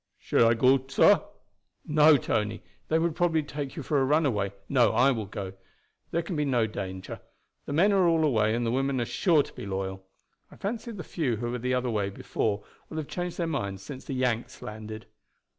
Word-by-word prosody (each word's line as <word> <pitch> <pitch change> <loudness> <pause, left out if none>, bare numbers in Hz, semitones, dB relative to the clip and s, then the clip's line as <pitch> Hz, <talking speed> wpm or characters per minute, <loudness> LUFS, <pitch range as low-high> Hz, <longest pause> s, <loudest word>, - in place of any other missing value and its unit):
"Shall 115 - +3
I 115 - +3
go, 130 +3 +4
sah?" 135 - +5 0.6
"No, 150 0 +6
Tony, 110 -3 -2 0.2
they 160 - +2
would 165 0 +1
probably 165 -3 +2
take 145 -1 -5
you 155 - -5
for 145 +1 +1
a - - +3
runaway. 130 -9 +1 0.2
No, 125 -4 +3
I 130 +3 +5
will 110 -5 -3
go. 95 -1 -6 0.6
There 170 +1 -1
can 175 - -4
be 150 - +1
no 125 -5 +2
danger. 95 -3 -6 0.5
The - - -3
men 190 +7 +4
are 190 -3 +4
all 165 -1 +3
away, 110 -7 +2
and 120 0 -1
the 115 - 0
women 135 +1 0
are 120 - 0
sure 160 - +3
to - - -13
be - - -7
loyal. 95 0 -4 0.5
I - - -15
fancy 225 +4 -4
the 200 -5 -7
few 140 -9 -1
who 120 +2 -3
were 125 - -3
the 125 +2 0
other 125 -1 -1
way 105 -3 0
before 100 +1 -2 0.3
will 160 - -7
have 155 -2 -3
changed 175 -1 -4
their 170 - 0
minds 100 -11 -3
since 130 +6 -8
the 135 - -5
Yanks 125 -2 -1
landed." 110 0 -7
130 Hz, 210 wpm, -28 LUFS, 110-155 Hz, 0.6 s, No